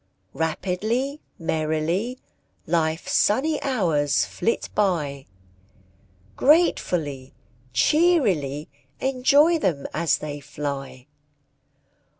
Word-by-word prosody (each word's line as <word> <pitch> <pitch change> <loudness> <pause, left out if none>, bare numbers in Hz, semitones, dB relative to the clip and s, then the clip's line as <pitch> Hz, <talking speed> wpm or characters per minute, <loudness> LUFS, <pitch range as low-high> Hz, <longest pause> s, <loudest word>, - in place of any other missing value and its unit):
Rapidly, 215 - -2 0.2
merrily, 160 +8 -1 0.5
Life's 160 0 -1
sunny 290 +8 +2
hours 165 - +1
flit 230 - -2
by, 150 -9 -1 1.1
Gratefully, 165 - +1 0.4
cheerily 195 - +2 0.3
Enjoy 280 +5 +3
them 160 - -1
as 170 0 +1
they 145 -1 -6
fly! 135 -2 -6
170 Hz, 70 wpm, -24 LUFS, -, 1.1 s, Enjoy